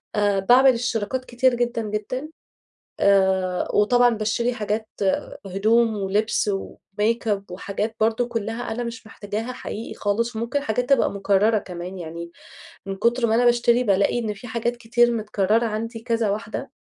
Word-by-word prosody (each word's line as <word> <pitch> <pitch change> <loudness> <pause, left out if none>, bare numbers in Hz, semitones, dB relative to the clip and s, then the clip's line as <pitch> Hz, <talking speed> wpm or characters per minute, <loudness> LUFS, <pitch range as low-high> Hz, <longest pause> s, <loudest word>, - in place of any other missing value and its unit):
آآ 205 -1 +2
باعمل 255 +7 +6
اشتراكات 235 +1 -2
كتيرة 245 0 +2
جدًا، 240 -1 -1
جدًا، 215 +7 -4 0.7
آآ 190 -2 +2
وطبعًا 245 +4 +4
باشتري 230 +2 -1
حاجات 215 0 -2 0.6
هِدوم، 220 +4 +2
ولِبس، 205 +2 0
وميك 210 +3 -3
أب، 200 -2 -1
وحاجات 200 +4 -4
برضه 225 +2 +2
كلها 230 0 -3
أنا 240 +2 -3
مش 230 -1 -7
محتاجاها 215 +3 -5
حقيقي 225 -2 -7
خالص، 225 +3 -1
وممكن 235 +5 -1
حاجات 245 +1 -1
تبقى 275 - +4
مكررة 200 +2 +2
كمان، 180 0 -7
يعني 170 0 -7 0.6
من 195 0 -4
كتر 235 +4 +1
ما 220 - +2
أنا 245 +1 +3
باشتري 240 0 +4
بالاقي 200 +2 +2
إن 220 -3 -2
في 205 +5 -11
حاجات 235 +1 -2
كتير 240 +1 +2
متكررة 215 0 +1
عندي، 225 +1 -3
كذا 230 -3 0
واحدة. 210 +1 -4
220 Hz, 150 wpm, -23 LUFS, 205-240 Hz, 0.7 s, باعمل